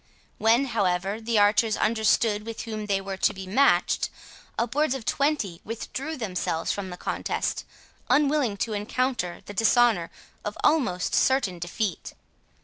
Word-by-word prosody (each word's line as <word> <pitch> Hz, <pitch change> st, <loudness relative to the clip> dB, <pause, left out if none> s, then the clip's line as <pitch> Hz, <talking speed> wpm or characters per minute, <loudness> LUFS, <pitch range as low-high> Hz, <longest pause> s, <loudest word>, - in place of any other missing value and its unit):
When, 230 Hz, +5 st, +4 dB
however, 200 Hz, -3 st, 0 dB
the 225 Hz, 0 st, 0 dB
archers 210 Hz, +1 st, +3 dB
understood 220 Hz, -1 st, +2 dB
with 225 Hz, 0 st, -6 dB
whom 215 Hz, -2 st, -5 dB
they 200 Hz, -1 st, +1 dB
were 195 Hz, 0 st, -5 dB
to -, -, +2 dB
be 190 Hz, 0 st, -7 dB
matched, 255 Hz, +10 st, +2 dB, 0.5 s
upwards 265 Hz, +4 st, +1 dB
of 250 Hz, -5 st, -7 dB
twenty 275 Hz, -, 0 dB
withdrew 265 Hz, +7 st, -5 dB
themselves 180 Hz, -7 st, -2 dB
from 200 Hz, -2 st, -4 dB
the 180 Hz, -, -7 dB
contest, -, -, -2 dB, 0.4 s
unwilling 275 Hz, -5 st, +2 dB
to 225 Hz, -, -5 dB
encounter 210 Hz, -3 st, -2 dB
the 205 Hz, -, -8 dB
dishonour 225 Hz, -4 st, +3 dB, 0.3 s
of -, -, -5 dB
almost 245 Hz, -, +2 dB
certain 235 Hz, -10 st, +2 dB
defeat. 175 Hz, +2 st, -3 dB
220 Hz, 140 wpm, -26 LUFS, 195-250 Hz, 0.5 s, When